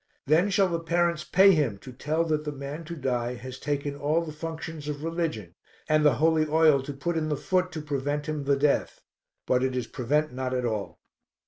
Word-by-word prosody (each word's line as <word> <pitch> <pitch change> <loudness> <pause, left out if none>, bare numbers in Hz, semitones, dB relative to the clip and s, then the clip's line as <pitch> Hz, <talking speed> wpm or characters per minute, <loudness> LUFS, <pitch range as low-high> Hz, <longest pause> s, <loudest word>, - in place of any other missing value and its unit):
Then 165 +7 +3
shall 195 0 +3
the 170 -2 -1
parents 170 0 0
pay 195 +3 +6
him 145 - +1
to 130 - -9
tell 155 +6 0
that 155 -2 -1
the 150 - -3
man 145 +3 -7
to 170 +2 -6
die 125 -4 -1
has 130 +1 -8
taken 145 -1 -2
all 150 +4 0
the 155 - -6
functions 160 -1 -6
of 150 0 -4
religion 160 - -3 0.3
and 155 0 +3
the 145 -5 +5
holy 160 +1 +3
oil 155 -2 +4
to 140 +2 -6
put 170 +5 -3
in 155 -1 -1
the 150 - 0
foot 180 +5 0
to 155 - -4
prevent 145 +1 -2
him 150 -2 -3
the 140 0 +3
death. 145 0 +1 0.4
But 125 0 +2
it 130 -1 0
is 125 -2 -1
prevent 145 +4 -1
not 130 0 -2
at 125 -1 -1
all. 110 -4 -3
150 Hz, 215 wpm, -27 LUFS, 135-165 Hz, 0.4 s, pay